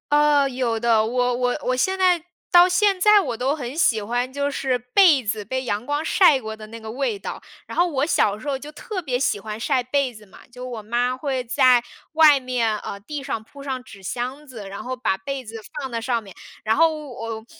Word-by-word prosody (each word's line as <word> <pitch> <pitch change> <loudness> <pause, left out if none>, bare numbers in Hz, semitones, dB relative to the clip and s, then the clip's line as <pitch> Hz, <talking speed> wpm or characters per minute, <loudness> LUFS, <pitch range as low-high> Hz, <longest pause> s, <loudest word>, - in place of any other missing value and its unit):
呃， 295 -1 +4
有 245 -3 -1
的， 225 -1 +3
我 245 +2 0
我 245 0 0
我 255 - 0
现 380 +9 0
在 365 -3 +3 0.3
到 350 0 +8
现 390 +1 +2
在 420 +2 +6
我 240 -11 -4
都 265 +4 0
很 270 -1 -6
喜 225 -9 +3
欢， 245 +4 -2
就 285 0 -1
是 265 -2 0
被 275 +3 +4
子 210 -1 -3
被 260 +5 -3
阳 215 -2 -2
光 290 +2 -1
晒 325 -3 +5
过 220 -1 -6
的 215 0 -10
那 225 +1 -9
个 220 -1 -8
味 250 -3 -2
道， 195 - -7 0.2
然 - - -9
后 350 +1 +4
我 285 -4 0
小 210 -10 +2
时 220 - -13
候 270 -1 -2
就 290 - -9
特 415 +1 -5
别 260 -7 -1
喜 245 -5 0
欢 215 +1 -6
晒 255 +3 0
被 255 +1 -1
子 215 -1 -14
嘛， 195 - -17
就 250 +1 -8
我 235 -3 -6
妈 240 +3 0
会 265 -1 -2
在 250 0 +4 0.3
外 305 -4 +6
面， 240 -4 0
呃， 200 - -7
地 285 +7 -6
上 225 - -3
铺 280 +5 -13
上 265 -2 -4
纸 195 -1 -14
箱 255 +8 -4
子， 230 -8 -9
然 195 +1 -7
后 255 0 -4
把 220 -6 0
被 275 +3 -5
子 220 +1 -9 0.2
放 270 -2 -4
在 230 -2 -3
上 235 0 -1
面， 195 -4 -14 0.3
然 220 +1 +2
后 325 0 +4
我 225 -3 -6
255 Hz, 245 characters per minute, -22 LUFS, 225-285 Hz, 0.3 s, 到